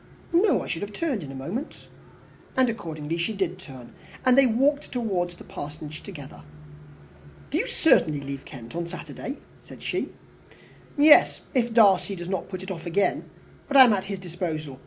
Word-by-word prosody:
"No, 360 +2 +4
I - - -7
should 165 - -3
have 205 0 -5
turned 275 - -1
in 140 -4 -7
a - - -8
moment." 180 - -6 0.7
And 260 -1 +5
accordingly 165 -7 -4
she 170 +6 -1
did 185 -3 -2
turn, 130 -9 -12 0.3
and 255 -1 +6
they 270 -1 +6
walked 280 +6 +1
towards 190 -8 -1
the - - -13
Parsonage 150 +1 -8
together. 145 -9 -10 1.1
"Do - - +1
you - - -1
certainly 150 -2 +3
leave 140 0 -6
Kent 120 -1 -10
on 170 0 -2
Saturday?" 170 - -7 0.2
said - - -14
she. - - -2 0.9
"Yes 295 +1 +6
if 240 -3 +1
Darcy 200 -3 +4
does 175 -1 -7
not 190 -1 -3
put 185 -1 -6
it 190 - -6
off 170 -1 -6
again. 195 +4 0 0.4
But 280 - +3
I 265 - +12
am 240 -4 +5
at 195 -2 -1
his 195 0 -4
disposal. 160 -6 -5
185 Hz, 180 wpm, -25 LUFS, 155-230 Hz, 1.1 s, I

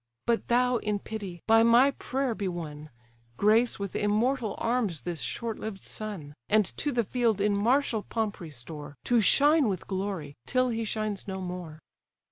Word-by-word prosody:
But 235 -1 +1
thou, 250 +1 +3
in 210 -2 -1
pity, 200 -5 -7
by 225 0 +6
my 235 +4 +6
prayer 265 -2 -2
be 205 -3 -3
won: 155 -4 -6 0.5
Grace 220 +4 +3
with 200 -2 -5
immortal 215 +2 +1
arms 230 -9 0
this 175 -3 -4
short 230 -2 -3
lived 210 -3 -6
son, 195 -10 -6 0.2
And 215 -1 +4
to 295 - 0
the 240 -3 +1
field 230 -1 +1
in 205 0 +2
martial 230 +2 +2
pomp 220 -1 -3
restore, 150 -2 -8
To 240 -2 +3
shine 290 +4 +5
with 185 -4 -3
glory, 190 -7 -3
till 255 0 +2
he 225 -1 -2
shines 215 -2 -3
no 190 -1 -4
more!" 180 -4 -6
215 Hz, 165 wpm, -28 LUFS, 185-235 Hz, 0.5 s, by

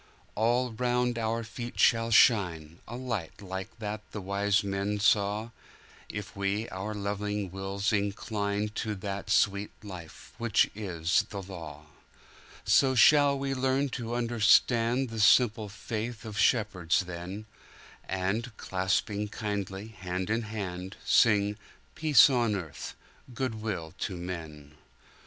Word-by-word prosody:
All 120 +3 +1
round 125 +1 0
about 115 - -3
our 115 +1 -1
feet 120 +2 -7
shall 115 -1 +4
shineA 85 -9 +3
light 115 -9 -4
like 95 +3 -7
that 105 -1 -4
the 105 - -4
wise 100 +1 +1
men 100 +1 -2
saw, 105 +2 +2 0.6
If 105 +1 -6
we 100 +3 -1
our 105 +3 -5
loving 105 -1 -3
wills 95 +2 -2
inclineTo 105 0 -2
that 100 +1 -5
sweet 100 0 +2
Life 90 -6 -10
which 115 -3 +2
is 90 -5 0
the 100 -1 -6
Law.So 85 - -3
shall 145 +2 +6
we 135 0 -2
learn 135 +1 +1
to 125 -2 -5
understandThe 115 +1 +3
simple 110 -1 +4
faith 110 +2 -5
of 110 -2 -7
shepherds 100 -6 +2
then, 90 +3 -7 0.6
And, 100 +5 -2
clasping 95 +2 -1
kindly 100 -1 -4
hand 95 -1 -4
in 115 +1 +1
hand, 95 -3 -5
Sing, 105 -2 +4 0.4
"Peace 155 -3 +6
on 120 -6 +1
earth, 85 -7 -6 0.4
good 115 -4 -3
will 90 -8 -4
to 95 - -3
men!" 80 -5 -7
105 Hz, 120 wpm, -29 LUFS, 95-115 Hz, 0.6 s, shall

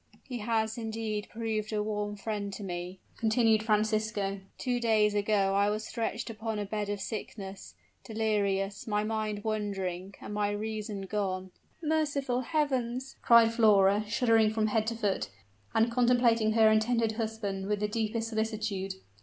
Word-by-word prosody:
"He 250 -3 -6
has, 220 +1 0
indeed, 220 -2 -3
proved 220 -1 -3
a 210 -1 0
warm 210 -1 -2
friend 205 -1 -3
to 205 - -6
me," 180 0 -5 0.2
continued 225 -1 +3
Francisco. 215 -2 0 0.2
"Two 245 -2 -1
days 215 -3 +3
ago 205 -1 +2
I 200 +1 +3
was 215 +1 -2
stretched 225 0 -3
upon 220 0 -4
a 205 - -2
bed 205 0 -3
of 205 -1 -2
sickness 195 - -6 0.3
delirious, 205 -3 -1
my 210 -1 +1
mind 215 -1 -2
wandering, 195 -3 -3
and 210 - -7
my 205 0 +1
reason 210 -1 -4
gone 190 -2 -2 0.2
" - - -38
"Merciful 290 -5 0
heavens!" 260 -3 -1
cried 230 -1 +6
Flora, 205 -3 +5
shuddering 225 -1 +3
from 220 0 +1
head 215 0 +1
to 230 - -1
foot, 205 -4 -1 0.5
and 225 +1 +3
contemplating 235 -2 +3
her 220 -1 +6
intended 225 +1 +2
husband 215 -3 -3
with 210 0 0
the 210 - 0
deepest 225 +1 -2
solicitude. 215 -3 -2
215 Hz, 155 wpm, -30 LUFS, 205-225 Hz, 0.5 s, cried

